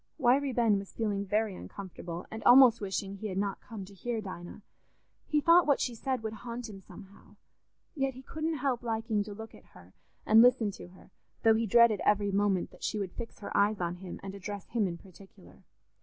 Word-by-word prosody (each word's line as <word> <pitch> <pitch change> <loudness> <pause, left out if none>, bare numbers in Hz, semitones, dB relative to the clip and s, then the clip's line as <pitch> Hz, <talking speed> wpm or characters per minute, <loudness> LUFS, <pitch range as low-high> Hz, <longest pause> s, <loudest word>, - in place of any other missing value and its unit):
Wiry 270 0 +3
Ben 225 -4 +2
was 195 - -10
feeling 205 -3 -2
very 210 +1 0
uncomfortable, 180 -2 -8
and 220 - -7
almost 245 -2 +7
wishing 195 0 -3
he 215 - -5
had 190 -2 -4
not 200 0 -2
come 215 -4 -8
to 200 - -15
hear 230 +4 -3
Dinah; 185 -1 -8 0.6
he 300 - +2
thought 335 +2 +5
what 285 - +3
she 245 - -1
said 255 +1 -3
would 220 0 -3
haunt 240 +1 -6
him 195 -3 -10
somehow. 195 +1 -15 0.6
Yet 270 -3 -1
he 260 - -11
couldn't 315 +3 -3
help 260 -3 -1
liking 225 -2 -1
to 205 -1 -8
look 220 +1 -9
at - - -15
her 90 +1 -16 0.3
and 220 +1 +7
listen 245 -3 +4
to - - -11
her, 185 +1 -18 0.3
though 225 -1 +6
he 225 +1 0
dreaded 235 -1 +5
every 205 -1 +2
moment 195 -2 +1
that - - -18
she 215 - -1
would 195 -3 -3
fix 235 +4 -8
her - - -6
eyes 205 +1 +3
on 175 0 -2
him 180 -1 -8
and 195 0 -6
address 200 0 -7
him 220 -4 +1
in 170 -1 -5
particular. 190 +2 -17
215 Hz, 210 wpm, -30 LUFS, 195-240 Hz, 0.6 s, almost